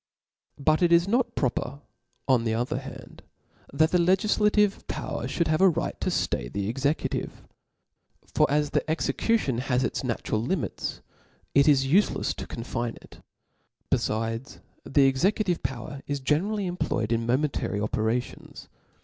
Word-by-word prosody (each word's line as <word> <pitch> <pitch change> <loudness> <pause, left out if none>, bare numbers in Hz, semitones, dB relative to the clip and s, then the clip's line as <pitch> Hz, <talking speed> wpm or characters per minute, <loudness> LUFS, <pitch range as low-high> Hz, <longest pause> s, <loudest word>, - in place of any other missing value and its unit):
But 155 +3 +2
it 175 -1 +4
is 170 +2 +5
not 240 +4 +1
proper, 130 +1 -1 0.5
on 130 -4 +3
the 110 -1 0
other 125 +5 -1
hand, 135 0 -11 0.5
that 155 +3 +2
the 180 - +3
legillative 210 +3 +2
power - - -4
(hould 170 - 0
have 155 +2 +1
a 190 - +7
right 165 - -3
to - - 0
flay - - -1
the 100 +9 -3
executive. 140 +7 -2 0.9
For - - +3
as 150 0 +1
the - - +2
execution 160 - 0
has 125 -1 0
its - - -2
natural 115 -3 -1
limits, 160 +6 -3 0.5
it 140 +1 +5
is 135 -3 +5
uielefs 185 +10 +2
to - - -6
confine 120 0 -4
it; - - -16 0.7
befides, 115 +4 -1 0.2
the 140 -1 +4
exe* 130 -1 0
cutive 195 -3 +1
power 130 +2 -5
is 145 -1 -2
generally 190 +10 0
employed 175 -11 -2
in 115 0 0
momentary 130 -5 0
operations. 110 +3 -3
140 Hz, 145 wpm, -26 LUFS, 120-175 Hz, 0.9 s, a